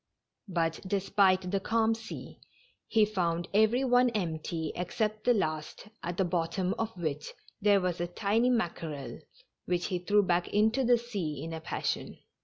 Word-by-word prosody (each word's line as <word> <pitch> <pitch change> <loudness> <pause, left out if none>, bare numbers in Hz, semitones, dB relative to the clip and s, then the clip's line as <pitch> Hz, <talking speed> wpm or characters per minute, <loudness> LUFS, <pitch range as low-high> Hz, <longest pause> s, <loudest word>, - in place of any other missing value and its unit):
But, 165 -3 0
despite 190 -1 +2
the 200 - +1
calm 225 +2 +2
sea, 225 0 -8 0.5
he 220 -2 +4
found 175 -5 -1
every 220 +5 +4
one 250 -1 +4
empty 165 -6 -2
except 215 +4 -2
the 245 - +5
last, 155 +1 -3
at 175 +1 -4
the 190 - +2
bottom 175 +2 0
of 225 -3 -3
which 155 -4 -3 0.3
there 205 -1 +5
was 180 -2 -1
a 175 - 0
tiny 215 +7 +1
mackerel, 165 - -2 0.5
which 175 -1 0
he 180 - 0
threw 205 +3 +3
back 175 -1 +1
into 220 +5 +2
the 245 0 +5
sea 195 - -4
in 165 0 -5
a 160 - -5
passion. - - -3
190 Hz, 160 wpm, -30 LUFS, 170-220 Hz, 0.5 s, the